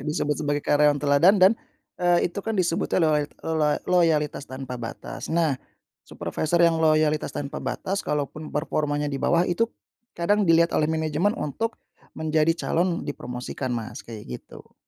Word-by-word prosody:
disebut 150 +1 -1
sebagai 145 -1 -1
karyawan 145 0 +4
teladan 145 +7 +4
dan 190 +2 +7 0.5
eee, 175 -1 +3
itu 200 - -4
kan 225 +1 -3
disebutnya 175 -2 0
loyalt 150 -2 +2 0.2
loloa 155 -2 +1
loyalitas 160 -5 +1
tanpa 130 -2 -6
batas. 115 - -7
Nah, 160 -5 +1 0.5
supervisor 155 +2 -2
yang 165 -1 +3
loyalitas 155 -1 +3
tanpa 140 -1 -5
batas, 195 +1 -2
kalaupun 150 +1 -3
performanya 150 -1 -1
di 135 - -3
bawah 170 +1 +3
itu 200 +7 +1 0.5
kadang 200 +2 +2
dilihat 165 +1 +5
oleh 150 - +2
manajemen 160 +5 0
untuk 225 +11 -3 0.4
menjadi 160 +1 +2
calon 175 +1 0
dipromosikan, 125 -2 -5
Mas, 110 -1 -6
kayak 110 -3 -9 0.2
gitu. - - -15
155 Hz, 145 wpm, -25 LUFS, 145-170 Hz, 0.5 s, dan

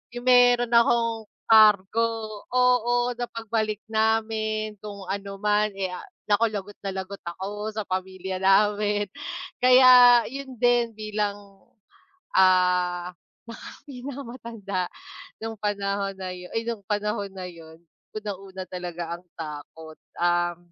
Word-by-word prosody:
'yung 245 - -6
meron 245 -1 +5
akong 230 -1 +2 0.2
kargo 215 0 +6 0.4
oo, 245 -1 +2
sa 245 0 -4
pagbalik 220 -2 -3
namin 220 -1 0
kung 200 -1 -8
ano 195 +1 -5
man 210 +1 +2
eh, 190 -2 -3
ah, 180 - -8 0.2
naku 225 +3 +4
lagot 205 -2 -7
na 195 -1 -5
lagot 190 +1 -6
ako 205 +4 -5
sa 215 - -2
pamilya 185 0 -4
namin. 205 +2 +3 0.6
Kaya, 250 -1 +8
yun 270 -1 -7
din 240 -1 +2
bilang, 210 -1 -2 1.0
ah, 180 -1 +3 0.3
naka 230 -1 -9 0.2
pinakamatanda 240 -7 -6 0.6
nung 225 0 -4
panahon 200 -1 -2
na 185 -1 -5
yun 180 0 -10
ay 225 - 0
nung 230 -3 -4
panahon 205 -1 -2
na 185 -1 -6
yun. 165 -2 -12 0.4
Unang-una 195 -3 -7
talaga 175 -2 -6 0.2
ang 180 - -22
takot, 155 0 -9 0.2
um, 175 0 +1
210 Hz, 120 wpm, -25 LUFS, 190-230 Hz, 1.0 s, Kaya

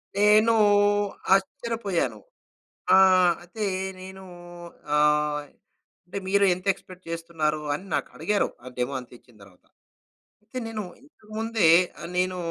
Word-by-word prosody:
నేను 210 +2 +5 0.8
ఆశ్చర్యపోయాను. 195 0 -2 0.8
ఆహ్, 185 -2 +5
అయితే 210 +5 -6 0.4
నేను 190 +1 -10 0.7
ఆహ్, 150 0 +2 0.7
అంటే 185 +3 -5
మీరు 200 +1 +3
ఎంత 185 +2 -12
ఎక్స్‌పెక్ట్ 185 -1 -15
చేస్తున్నారు 165 -2 -2
అని 155 - -6
నాకడిగారు? 210 -1 -1 0.2
ఆ - - -12
డెమోంతిచ్చిన 125 -1 -6
దర్వాత. 95 -2 -19 0.8
అయితే 220 +4 -10
నేను 220 -2 -4 0.2
ఇంతకుముందే 220 - -2 0.3
ఆహ్, - - -7
నేను 185 0 0
185 Hz, 100 wpm, -25 LUFS, 155-210 Hz, 0.8 s, నేను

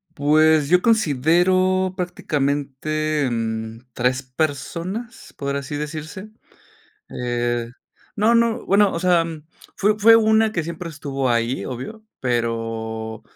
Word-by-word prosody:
Pues 155 0 +3
yo 180 +1 +5
considero 185 - +2
prácticamente, 150 -3 -1
mm, 110 -1 -3 0.2
3 125 +3 0
personas, 170 - -4
por 140 0 -3
así 140 +1 -4
decirse. 155 +7 -6 0.8
Eh, 120 -1 -2 0.4
no, 220 +3 +3
no, 230 -1 +2
bueno, 200 0 +4
o 165 - -3
sea, 175 -2 +3 0.5
fue 210 +1 +2
fue 225 +2 +7
una 220 0 +3
que 170 - -1
siempre 170 +1 -6
estuvo 140 -4 -3
ahí, 120 +2 0
obvio, 130 - -7 0.2
pero, 115 -2 -3
155 Hz, 110 wpm, -21 LUFS, 125-185 Hz, 0.8 s, fue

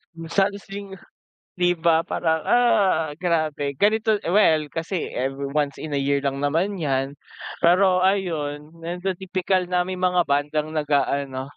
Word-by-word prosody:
Yung 165 0 -9
salo 200 0 +2
sing 200 -1 -8 0.6
di 180 -1 +2
ba 165 -1 +2
parang, 160 -2 -1
ah, 190 -11 +2
grabe 155 -5 -1
ganito 215 +1 +2
well 165 -5 +3
kasi 165 +4 -3
every 135 +2 -2
once 145 -2 0
in 155 -2 -4
a 140 - 0
year 140 0 +2
lang 140 0 -2
naman 170 +8 0
yan, 140 -4 -1 0.5
pero 185 +1 +4
ayun, 160 -6 -1
nandun 180 +2 -3
tipikal 185 0 -1
na 180 0 -1
may 185 - -3
mga 180 -1 +1
bandang 145 +2 0
nag-aano, 140 -3 -1
165 Hz, 145 wpm, -23 LUFS, 145-185 Hz, 0.6 s, pero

